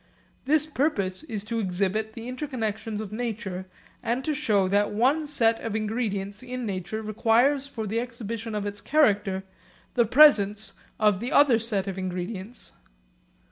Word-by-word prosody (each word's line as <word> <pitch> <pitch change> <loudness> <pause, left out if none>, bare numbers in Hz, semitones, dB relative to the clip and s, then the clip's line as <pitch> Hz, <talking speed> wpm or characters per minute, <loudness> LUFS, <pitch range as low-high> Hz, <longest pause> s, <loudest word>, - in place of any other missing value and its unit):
This 305 +2 +3
purpose 260 -11 -1
is 225 -10 -5
to 230 +2 -3
exhibit 200 +3 -1
the 230 +1 -8
interconnexions 225 -5 -3
of 215 -2 -6
nature, 215 -5 -4 0.3
and 245 +3 -1
to 310 - 0
show 215 -10 +2
that 205 +2 +2
one 270 +8 +2
set 230 -6 +3
of 225 -2 -3
ingredients 210 -2 -2
in 255 -1 -5
nature 195 +2 -4
requires 235 +6 +2
for 225 -5 -5
the 220 +3 -1
exhibition 230 -2 -5
of 205 -1 -2
its 205 0 -5
character 205 -10 +2 0.5
the 235 - +3
presence 215 -6 +5 0.3
of 210 -3 +3
the 240 +4 -4
other 275 -6 +5
sets 210 -4 -1
of 190 -1 -4
ingredients. 185 +4 -5
220 Hz, 150 wpm, -26 LUFS, 200-245 Hz, 0.5 s, presence